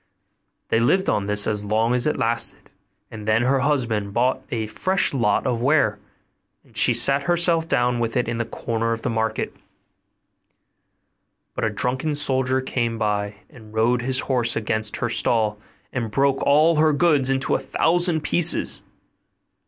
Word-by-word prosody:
They 115 - +2
lived 185 +12 +2
on 100 -1 -1
this 105 0 +3
as 105 -1 -2
long 110 +3 0
as 125 +2 0
it 150 - 0
lasted; 115 +1 -1 0.4
and 110 -1 -9
then 110 +2 +2
her 135 +2 +2
husband 120 -8 -1
bought 125 +2 +1
a 115 -2 -3
fresh 185 - -1
lot 115 -6 +1
of 120 -3 -1
ware, 125 -6 +2 0.6
and - - -26
she - - +5
sat 130 +4 +4
herself 170 0 +2
down 120 -4 +1
with 115 +2 -2
it 125 - 0
in 115 0 -3
the 120 - -1
corner 115 0 -3
of 115 - -7
the 125 - -1
market; 110 0 -2 2.0
but - - -4
a - - +1
drunken 130 +8 -2
soldier 130 -2 0
soon - - -11
came 115 -3 -2
by, 105 -1 -2
and 110 -2 -16
rode 120 +2 +2
his 130 +2 0
horse 120 -3 0
against 110 -1 -1
her 120 - -1
stall, 110 -2 +1 0.3
and 120 -3 -3
broke 135 +4 +1
all 155 +3 +3
her 155 0 +3
goods 145 -3 +2
into 135 0 0
a - - +1
thousand 165 +4 +1
pieces. 170 +2 +1
120 Hz, 170 wpm, -22 LUFS, 110-140 Hz, 2.0 s, she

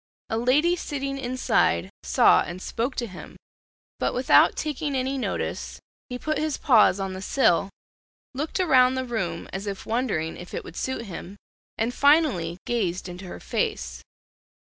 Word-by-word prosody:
A 225 - +1
lady 295 +9 +3
sitting 275 -4 -4
inside 255 0 +1
saw - - +5
and 175 +2 -5
spoke 235 +7 -3
to 240 - -2
him; 185 -5 -11 0.6
but - - 0
without - - +5
taking 300 -1 -2
any 260 +1 -1
notice, 260 - -3 0.3
he 250 - -4
put 310 +4 -2
his 310 -2 -1
paws 220 -6 +5
on 195 -1 -3
the 185 - -6
sill, 195 -6 +2 0.6
looked 300 +7 -3
around 260 -8 +5
the 260 0 -2
room 190 -9 -3
as 195 +2 -4
if 195 -1 -5
wondering 220 -9 -1
if 175 - -9
it - - -4
would 165 - -11
suit 260 -3 -3
him, 190 0 -8 0.4
and 230 +3 0
finally 280 - +3
gazed 190 -7 -1
into 180 +1 -8
her 180 - -8
face. 445 -3 -2
245 Hz, 160 wpm, -25 LUFS, 190-275 Hz, 0.6 s, saw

